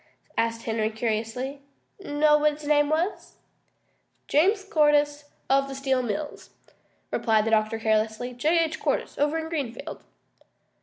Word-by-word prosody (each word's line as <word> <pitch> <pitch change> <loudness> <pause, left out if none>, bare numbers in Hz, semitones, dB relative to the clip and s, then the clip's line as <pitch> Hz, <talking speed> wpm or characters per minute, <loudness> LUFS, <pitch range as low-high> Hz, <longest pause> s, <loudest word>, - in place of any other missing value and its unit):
asked 230 0 -1
Henry 220 -1 0
curiously. 230 +5 -3 0.4
"Know 300 -3 +3
what 300 0 +3
his 295 0 -9
name 295 -1 +3
was?" 330 +6 -1 0.9
"James 390 +7 +3
Cordyce, 295 -5 +2 0.2
of 275 0 +3
the 270 - -6
Steel 265 -1 0
Mills," 250 +6 -5 0.6
replied 220 -2 +2
the 225 - 0
doctor 215 0 +2
carelessly. 220 +2 0
"J. 315 +7 +2
H. 320 0 -3
Cordyce - - -2
over 295 +2 +2
in 320 0 -3
Greenfield." 285 -2 -5
280 Hz, 135 wpm, -26 LUFS, 230-300 Hz, 0.9 s, Know